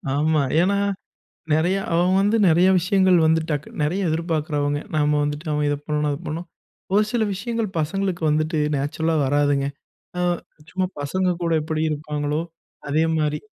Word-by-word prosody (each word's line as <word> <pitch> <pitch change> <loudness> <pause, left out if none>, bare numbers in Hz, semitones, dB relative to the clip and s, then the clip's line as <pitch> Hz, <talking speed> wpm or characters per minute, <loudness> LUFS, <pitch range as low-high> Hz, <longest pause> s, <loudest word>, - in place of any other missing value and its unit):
ஆமா. 155 0 +2 0.2
ஏன்னா, 200 +2 +2 0.8
நிறைய 175 +5 +2 0.2
அவன் 175 +2 +3
வந்து 205 +3 +2
நிறைய 175 +3 +5
விஷயங்கள் 185 0 +3
வந்து 160 0 +3
டக் 150 0 -2 0.2
நிறைய 180 +4 0
எதிர்பார்க்கிறவங்க. 150 -3 -1 0.2
நாம 150 0 +2
வந்துட்டு 150 +3 -4
அவன் 150 0 0
இத 145 - 0
பண்ணணும், 150 -1 0
அத 140 - -2
பண்ணும். 165 +3 -4 0.5
ஒரு 210 +1 +5
சில 235 -2 +1
விஷயங்கள் 225 +1 -2
பசங்களுக்கு 185 +2 -2
வந்துட்டு 155 +1 0 0.2
நேச்சுரல்லா 160 +3 -1
வராதுங்க. 145 0 +2 1.0
சும்மா 185 0 -1
பசங்க 180 +5 0
கூட 165 -1 0
எப்படி 155 0 -2
இருப்பாங்களோ 150 +1 -2 0.5
அதே 155 +2 +2
மாதிரி. 150 -1 0
160 Hz, 140 wpm, -22 LUFS, 150-180 Hz, 1.0 s, நிறைய